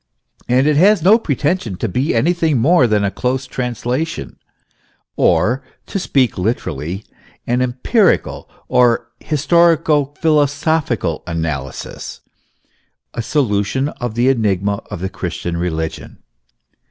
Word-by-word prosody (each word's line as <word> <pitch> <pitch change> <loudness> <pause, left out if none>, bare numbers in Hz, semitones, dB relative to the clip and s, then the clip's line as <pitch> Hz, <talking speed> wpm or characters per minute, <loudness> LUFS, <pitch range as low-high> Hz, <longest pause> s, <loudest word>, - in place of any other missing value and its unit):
And 130 +2 +3
it 150 -1 +3
has 195 +1 +4
no 210 +6 +6
pretension 145 - -1
to 115 - -3
be 125 - -1
anything 160 +3 +2
more 135 +2 +4
than 105 -2 +1
a 100 - 0
close 130 +4 -2
translation, 125 +5 -3 0.8
or, 105 +11 +2 0.2
to 195 - -3
speak 130 - +1
literally, 90 - -3 0.4
an 125 +1 0
empirical 130 - +1 0.2
or 120 -2 +2
historico 155 -2 +2
philosophical 145 - +1
analysis, 80 -5 -5 0.9
a - - -3
solution 120 +1 0
of 120 -6 -5
the 120 +2 +2
enigma 100 -5 +1
of 85 - -6
the 95 - -2
Christian 85 -2 -4
religion. 80 -2 -4
125 Hz, 115 wpm, -18 LUFS, 100-150 Hz, 0.9 s, no